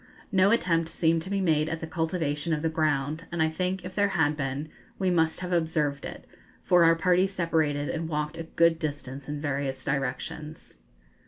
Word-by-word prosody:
No 190 0 +5
attempt 165 -7 +2
seemed 165 -1 +1
to 185 - -7
be 200 0 0
made 155 -3 +2
at 160 - -3
the 160 - -4
cultivation 160 -1 -1
of 150 0 -2
the 160 - +2
ground; 155 0 0
and 170 - -3
I 160 0 +3
think, 180 +3 -2
if 185 - -6
there 205 0 +3
had 150 -1 +3
been, 140 +1 -3 0.3
we 190 -2 +1
must 160 -1 +1
have 180 0 -3
observed 155 -4 0
it, - - -8 0.4
for 175 -1 +5
our 165 0 +6
party 180 +3 +3
separated 160 -6 0
and 165 0 -3
walked 150 0 -2
a 165 0 -6
good 165 0 +3
distance 140 -3 -5
in 145 0 -3
various 140 -2 -2
directions. 140 - -4
160 Hz, 190 wpm, -27 LUFS, 150-170 Hz, 0.4 s, our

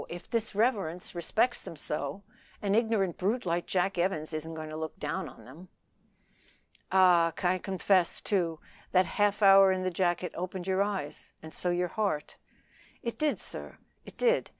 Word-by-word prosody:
if 175 0 -9
his 230 -3 -1
reverence 200 -7 0
respects 220 +8 0
them - - -9
so, 150 +5 -4 0.4
an 200 -1 0
ignorant 215 -5 +1
brute 215 +6 0
like 170 0 -1
Jack 185 0 0
Evans 165 -3 -1
isn't 160 +1 -4
to 155 -1 -6
look 160 +2 -5
down 190 -4 -3
on 115 -3 -15
them." 160 +9 -13 1.2
"Ah! 180 -3 +6 0.3
confess, 190 -2 +2
too, 170 -6 0 0.3
that 185 0 +5
half 205 +3 +1
hour 195 -1 +8
in 185 0 -1
the 185 - 0
jacket 175 0 0
opened 180 +1 -5
your 190 0 +1
eyes 195 -8 -3
and 160 - -10
so 180 - 0
your 175 0 0
heart." 200 -8 -2 0.7
"It 235 - -4
did, 305 -1 +1
sir; - - -9 0.3
it - - -13
did. - - +2
185 Hz, 160 wpm, -30 LUFS, 170-200 Hz, 1.2 s, hour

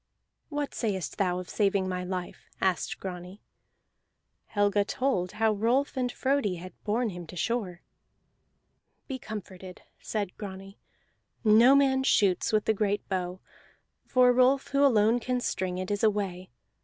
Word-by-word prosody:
"What 290 -2 -3
sayest 200 -6 -3
thou 180 -2 +1
of 180 -1 -6
saving 200 -2 +1
my 180 -1 -3
life?" 180 -1 -6
asked 185 -4 0
Grani. 180 +1 -7 1.1
Helga 205 0 +2
told 200 -5 -1
how 220 +1 +2
Rolf 240 +8 +1
and 250 -2 -1
Frodi 260 -9 0
had 180 +2 -9
borne 225 +2 0
him 175 -2 -8
to 180 - -10
shore. 185 -3 -2 1.2
"Be 265 -2 -5
comforted," 190 -5 -9 0.2
said 205 -4 -3
Grani. 195 -1 -9 0.6
"No 230 +5 +7
man 270 -1 +3
shoots 200 -8 +2
with 215 -1 +2
the 220 - +3
great 205 -1 -1
bow, 185 -1 -3 0.6
for 250 -1 +4
Rolf, 255 +2 +3
who 280 0 +2
alone 230 -3 +4
can 250 +1 -1
string 185 -6 -2
it, 185 +2 -4
is 205 - -1
away. 195 -4 0
205 Hz, 145 wpm, -28 LUFS, 185-245 Hz, 1.2 s, No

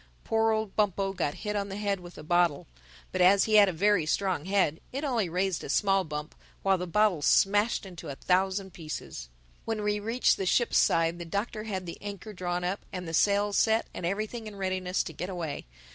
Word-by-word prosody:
Poor 225 0 +2
old 220 -2 -2
Bumpo 195 -2 +1
got 165 -6 -2
hit 210 0 -1
on 200 -1 -2
the 195 - -5
head 200 -2 -1
with 175 0 -12
a - - -9
bottle. 175 -2 +2 0.5
But - - -1
as 195 +2 +6
he 215 -1 +4
had 200 -2 +7
a - - -1
very 185 -1 +2
strong 185 -2 0
head 190 -5 +1
it 275 +3 -4
only 235 - 0
raised 185 +1 -1
a - - -7
small 195 +4 +2
bump 150 -2 -6 0.3
while 195 -1 +3
the 180 - -4
bottle 200 -2 +2
smashed 205 +8 +3
into 175 -4 -9
a 140 - -5
thousand 190 +3 0
pieces. 155 - -7 0.3
When 220 -2 -3
we 210 0 0
reached 230 +4 +2
the 190 - -2
ship's 240 +5 +3
side 165 +1 +2
the - - -4
Doctor 210 +5 -3
had 190 -4 -4
the 170 - -7
anchor 205 +1 -7
drawn 180 -1 -3
up 185 +3 -2
and 180 -2 -5
the 165 - -5
sails 205 +3 +2
set 220 0 +3
and - - -7
everything 215 +5 -3
in 210 - -8
readiness 185 -1 -1
to 160 - -7
get 175 +5 -5
away. 165 - -5
195 Hz, 215 wpm, -28 LUFS, 175-210 Hz, 0.5 s, had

